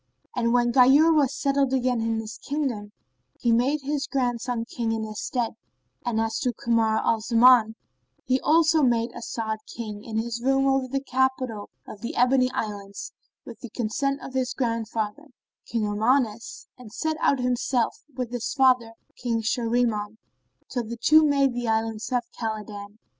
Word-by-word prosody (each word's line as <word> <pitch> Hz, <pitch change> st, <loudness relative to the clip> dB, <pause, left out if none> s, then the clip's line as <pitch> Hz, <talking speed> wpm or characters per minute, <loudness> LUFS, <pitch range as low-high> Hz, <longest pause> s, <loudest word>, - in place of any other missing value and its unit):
And 235 Hz, -1 st, +1 dB
when 240 Hz, 0 st, +3 dB
Ghayur 275 Hz, +6 st, +6 dB
was 290 Hz, -5 st, +3 dB
settled 275 Hz, -1 st, 0 dB
again 250 Hz, -2 st, +1 dB
in 225 Hz, 0 st, -1 dB
his 220 Hz, 0 st, -7 dB
kingdom, 260 Hz, -8 st, -3 dB, 0.5 s
he 235 Hz, -, +1 dB
made 260 Hz, +6 st, +2 dB
his 285 Hz, 0 st, -2 dB
grandson 245 Hz, -2 st, -1 dB
King 230 Hz, -1 st, -3 dB
in 225 Hz, -1 st, -2 dB
his 215 Hz, -1 st, -6 dB
stead; 240 Hz, -3 st, -1 dB, 0.5 s
and 240 Hz, -3 st, -1 dB
as 225 Hz, 0 st, -1 dB
to 255 Hz, -5 st, 0 dB
Kamar 225 Hz, -1 st, +1 dB
al 225 Hz, -, +2 dB
Zaman 230 Hz, -1 st, +5 dB, 0.5 s
he 260 Hz, +1 st, +1 dB
also 320 Hz, 0 st, +4 dB
made 235 Hz, -3 st, +2 dB
As'ad 220 Hz, -2 st, -4 dB
king 215 Hz, -3 st, -7 dB
in 220 Hz, -2 st, -5 dB
his 235 Hz, +1 st, -2 dB
room 270 Hz, +2 st, +2 dB
over 270 Hz, -1 st, +2 dB
the 275 Hz, +2 st, -2 dB
capital 260 Hz, -5 st, -1 dB, 0.2 s
of 200 Hz, -, -10 dB
the 235 Hz, -, -5 dB
Ebony 255 Hz, +1 st, +3 dB
Islands, 200 Hz, -3 st, -5 dB, 0.3 s
with 235 Hz, -, -10 dB
the 240 Hz, -, -9 dB
consent 270 Hz, +5 st, -1 dB
of 260 Hz, -, -8 dB
his 255 Hz, -1 st, -1 dB
grandfather, 230 Hz, +2 st, -2 dB, 0.4 s
King 230 Hz, -2 st, -1 dB
Armanus 225 Hz, -, 0 dB
and 235 Hz, -4 st, -12 dB
set 315 Hz, +6 st, -2 dB
out 280 Hz, -, +3 dB
himself, 250 Hz, -1 st, 0 dB
with 250 Hz, -3 st, -5 dB
his 245 Hz, -1 st, -3 dB
father, 255 Hz, -4 st, +3 dB, 0.2 s
King 230 Hz, -2 st, -2 dB
Shahriman, 225 Hz, -2 st, 0 dB, 0.5 s
till 245 Hz, -, -3 dB
the 235 Hz, +2 st, -6 dB
two 310 Hz, +6 st, +5 dB
made 280 Hz, -3 st, +3 dB
the 240 Hz, -1 st, -3 dB
Islands 225 Hz, +1 st, -1 dB
of 245 Hz, -1 st, +1 dB, 0.2 s
Khбlidan. 210 Hz, -2 st, -5 dB
240 Hz, 165 wpm, -25 LUFS, 225-265 Hz, 0.5 s, Ghayur